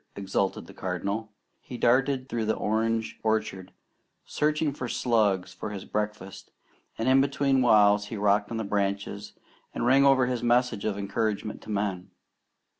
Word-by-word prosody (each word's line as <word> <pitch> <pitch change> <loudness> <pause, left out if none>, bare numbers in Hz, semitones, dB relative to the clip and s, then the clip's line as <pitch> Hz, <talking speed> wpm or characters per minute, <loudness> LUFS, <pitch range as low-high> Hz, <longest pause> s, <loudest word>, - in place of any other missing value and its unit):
exulted 95 0 -2
the - - -13
Cardinal 100 +4 -4 0.3
He 125 - -9
darted 130 +2 +2
through 115 -4 -2
the 110 - +1
orange 110 +1 -1
orchard 110 -4 -2 0.5
searching 150 -1 0
for 125 -3 -5
slugs 110 -7 +1
for - - -6
his 100 -2 -7
breakfast, 105 -2 -5 0.5
and 130 +4 +4
between 135 -1 +1
whiles 105 -3 +4
he 110 - -6
rocked 100 0 +2
on 115 - -4
the 110 - -2
branches 100 0 -2 0.4
and - - -1
rang 135 +3 +5
over 135 -2 +5
his 125 -1 -2
message 120 -3 +1
of 105 -2 -1
encouragement 105 +1 -2
to - - -13
men. 100 -3 -2
110 Hz, 150 wpm, -27 LUFS, 100-125 Hz, 0.5 s, rang